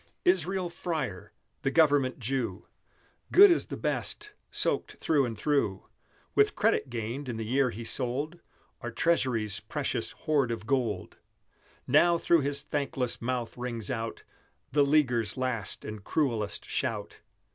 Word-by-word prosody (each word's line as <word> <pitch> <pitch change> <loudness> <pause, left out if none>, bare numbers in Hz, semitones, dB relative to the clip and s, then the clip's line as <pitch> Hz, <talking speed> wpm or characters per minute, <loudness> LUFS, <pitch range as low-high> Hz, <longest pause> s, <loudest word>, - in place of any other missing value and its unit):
Israel 185 +1 +2
Freyer 155 - -4 0.3
the - - +1
Government 145 -4 +3
Jew 115 -5 -2 0.7
Good 395 0 +9
as 340 - +2
the - - -5
best 420 - -2 0.2
soaked - - 0
through 145 -4 +2
and 115 -3 -5
through 120 -7 0 0.5
With - - +3
credit - - +2
gained 120 +4 -4
in 115 - -3
the 110 - -3
year 130 +3 +2
he 115 0 -6
sold 135 +8 -2 0.4
Our 120 - -4
Treasury's 120 -6 +1
precious - - -3
hoard 145 -5 +1
of 115 -2 -4
gold; 115 -7 -1 0.7
Now 170 +5 +5
through 170 -1 +3
his 140 0 0
thankless 135 -4 -2
mouth 120 -1 -2
rings 120 -2 -3
out 115 -2 -4 0.5
The 145 - +3
leaguers' 125 -7 +2
last 125 -6 -3
and 105 -2 -7
cruellest 115 -9 -1
shout! - - -2
130 Hz, 135 wpm, -29 LUFS, 115-150 Hz, 0.7 s, Good